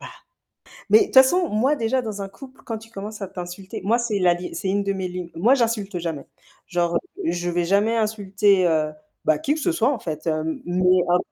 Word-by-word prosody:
Bah, - - -8 0.8
mais 440 - +8
de - - +4
toute - - -14
façon, 290 +7 +6
moi, 255 +8 +1
déjà, 255 +1 0
dans 210 -3 -5
un 195 - -5
couple 260 +7 -14
quand 225 -2 -4
tu 225 +1 -15
commences 210 +1 -7
à 195 - -4
t'insulter 180 +1 -7
moi 230 +4 +3
c'est 235 -4 -1
la 180 -2 +4
dé 175 +1 -7
c'est 195 - -3
une 200 +1 +1
de 200 0 -1
mes 190 -1 -3
lignes. 180 -1 -6
Moi, 220 +11 +4
j'insulte 225 -7 -1
jamais, 165 -5 -5 0.4
genre, 175 -1 0
heu, - - +5 0.3
je 175 0 -2
vais 175 0 0
jamais 205 +6 +2
insulter, 205 -3 +2
heu, 155 -2 +1 0.3
bah, 155 -1 +3
qui 285 - 0
que 315 - -5
ce 345 - +1
soit, 265 -6 +2
en 265 - -3
fait, 155 -5 -6
hem, 155 0 -1
mais 180 +1 +3
en 175 +1 +4
195 Hz, 235 wpm, -23 LUFS, 175-225 Hz, 0.8 s, mais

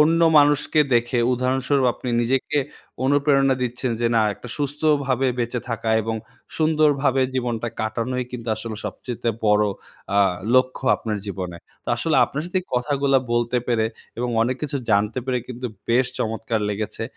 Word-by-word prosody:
অন্য 165 +2 +4 0.2
মানুষকে 145 +1 +3
দেখে 120 +1 +2
উদাহরণস্বরূপ 130 +2 +1
আপনি 125 - -7
নিজেকে 130 +4 0 0.5
অনুপ্রেরণা 135 -1 +3
দিচ্ছেন, 125 +1 -2
যে 120 - +2
না 115 - +5
একটা 125 - -11
সুস্থভাবে 140 -2 +1
বেঁচে 120 0 -1
থাকা, 115 -1 -3
এবং 110 +1 -2 0.4
সুন্দরভাবে 150 -4 +3
জীবনটা 120 -2 -1
কাটানোই 115 +3 -2
কিন্তু 115 -2 -6
আসলে 110 0 -6
সবচাইতে 120 -2 -4 0.2
বড়ো 105 0 +4 0.5
আ - - +5 0.4
লক্ষ্য 130 +1 +2
আপনার 110 -2 -3
জীবনে। 95 -3 -5 0.3
তো - - -8
আসলে 155 +4 +1
আপনার 150 - -4
সাথে 185 +1 0
এই - - -28
কথাগুলা 140 +1 +2
বলতে 120 +1 +1
পেরে, 115 -2 +2 0.3
এবং 125 +1 -1
অনেক 125 +2 0
কিছু 145 -1 -2
জানতে 105 +3 +2
পেরে, 130 -1 0
কিন্তু 125 0 -5 0.2
বেশ 125 +2 +3
চমৎকার 110 0 -1
লেগেছে। 105 +1 -4
125 Hz, 150 wpm, -23 LUFS, 115-140 Hz, 0.5 s, না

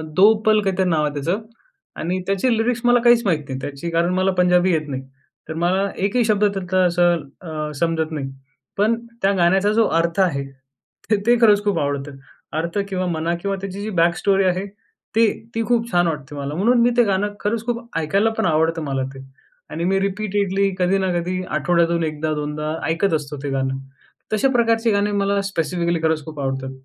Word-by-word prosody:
"दो 205 +4 +7
पल" 215 0 +5
काहीतरी 190 -1 0
नाव 155 -2 +2
आहे 145 - -2
त्याचं 165 +9 -2 0.6
आणि 180 +3 -1
त्याची 220 +5 +1
लिरिक्स 230 +1 0
मला 245 0 +5
काहीच 240 -1 +5
माहीत 165 -6 +2
नाही 130 0 -4
त्याची 145 +5 -5
कारण 170 +2 +1
मला 185 +1 +2
पंजाबी 180 +1 +4
येत 155 -1 -1
नाही. 135 -1 -3 0.5
तर, - - -3
मला 185 +4 +1 0.2
एकही 235 +4 +2
शब्द 210 -1 +2
त्यातला 190 -2 0
असा 175 0 +3 0.4
अ, 155 -1 -4
समजत 160 -1 0
नाही. 135 -3 -4 0.5
पण 215 +3 +3 0.3
त्या 195 +1 +3
गाण्याचा 190 +4 +3
जो 225 0 +4 0.2
अर्थ 170 +3 -1
आहे, 140 -8 +1 0.6
तर, 215 - +4
ते 240 - +6
खरंच 205 -3 +5
खूप 200 -5 +1
आवडतं. 140 0 -3 0.4
अर्थ 170 +4 -3
किंवा 185 -1 -2
म्हणा 165 0 -1
किंवा 195 +1 -1
त्याची 195 0 -6
जी 215 - -4
बॅक 170 0 +3
स्टोरी 195 -1 +2
आहे, 185 +2 0 0.5
ती 225 0 +5 0.3
ती 230 - 0
खूप 235 -1 +1
छान 175 0 +3
वाटते 150 -3 -4
मला. 140 0 -4
म्हणून 235 +7 +3
मी 240 - +5
ते 240 - +6
गाणं 205 +1 0
खरंच 220 +2 -2
खूप 240 0 -3
ऐकायला 195 +8 +1
पण - - +1
आवड 165 - +2
आवडतं 165 +1 +1
मला 135 -2 -2
ते. 135 - -10 0.5
आणि 165 - -4
मी 195 +1 +2
रिपीटेडली 200 0 0
कधी 185 +2 +2
ना 190 -1 0
कधी 185 +2 -3
आठवड्यातून 170 +2 +1
एकदा-दोनदा 150 0 -2
ऐकत 165 +3 +1
असतो 150 -2 -2
ते 140 - -2
गाणं. 135 0 -1 0.6
तशा 215 +5 +2
प्रकारचे 230 -1 +2
गाणे 205 +1 +1
मला 200 0 +1
स्पेसिफिकली 170 -1 -1
खरंच 160 -2 0
खूप 155 -2 -8
आवडतात. 135 -1 -3
180 Hz, 190 wpm, -21 LUFS, 160-205 Hz, 0.6 s, दो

